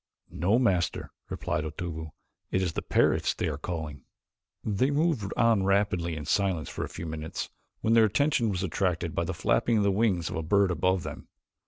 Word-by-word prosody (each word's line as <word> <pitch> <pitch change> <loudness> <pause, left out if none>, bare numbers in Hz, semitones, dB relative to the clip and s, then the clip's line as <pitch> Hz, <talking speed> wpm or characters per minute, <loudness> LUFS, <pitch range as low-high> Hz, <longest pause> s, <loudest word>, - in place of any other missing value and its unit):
"No, 95 +8 +2
Master," 95 -9 +1 0.2
replied 75 - -2
Otobu. 80 0 -5 0.4
"It 95 - +1
is 90 -4 -1
the - - -2
parrots - - +2
they - - -1
are 75 -2 -3
calling." 80 -4 -5 0.6
They 110 +5 +1
moved 145 - +1
on 115 -3 +4
rapidly 95 -4 +1
in 75 -2 -6
silence 95 -5 0
for - - -4
a - - -5
few 85 - -7
minutes 80 0 -5 0.3
when 110 - +2
their 115 -1 +7
attention 120 +1 +2
was 95 -2 -1
attracted 85 -2 -1
by 85 - 0
the 90 +1 -3
flapping 115 +6 +2
of 105 - +3
the 100 - +3
wings 95 -5 +1
of - - -4
a - - -1
bird 100 +4 +3
above 90 +2 +1
them. - - -7
95 Hz, 190 wpm, -28 LUFS, 80-105 Hz, 0.6 s, their